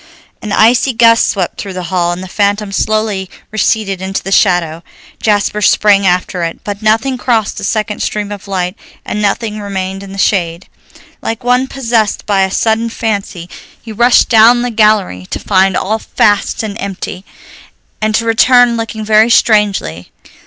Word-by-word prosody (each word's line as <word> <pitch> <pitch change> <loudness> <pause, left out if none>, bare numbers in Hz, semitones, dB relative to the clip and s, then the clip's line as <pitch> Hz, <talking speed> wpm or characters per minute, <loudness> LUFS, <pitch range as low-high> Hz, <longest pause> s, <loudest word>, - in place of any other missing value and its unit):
An 210 - -6
icy 240 +5 +3
gust 230 0 +4
swept 185 -4 -3
through 195 -2 -7
the 180 - -4
hall, 175 -1 +1
and 175 +1 -5
the - - -8
phantom 205 +1 -1
slowly 210 -2 -1 0.2
receded 210 -3 -1
into 190 +1 -3
the 195 - -5
shadow. 175 -5 +2 0.4
Jasper 210 0 0
sprang 200 -1 +3
after 180 0 0
it, 165 0 -5
but 205 0 -5
nothing 225 +4 +1
crossed 230 -5 0
the - - -8
second 215 -1 -2
stream 210 -1 -3
of 205 -1 -8
light, 180 -2 -2 0.3
and 210 - -3
nothing 210 +1 -1
remained 195 -1 -4
in 200 -1 -10
the 195 - -9
shade. 175 -3 -1 0.5
Like 225 +2 -4
one 250 +2 +1
possessed 230 -6 -1
by 200 -2 +1
a 190 - +1
sudden 225 +3 0
fancy 200 -6 -4 0.3
he 225 - -10
rushed 240 +3 +3
down 235 +1 +5
the 245 - -2
gallery 210 - +1
to - - -4
find 190 -1 +1
all 220 +3 -1
fast 205 0 0
and 210 -2 -5
empty, 195 -1 -6 0.8
and 215 0 0
to 230 - 0
return 245 +1 +4
looking 220 -1 -5
very 215 +1 +4
strangely. 205 - +1
210 Hz, 165 wpm, -13 LUFS, 190-225 Hz, 0.8 s, down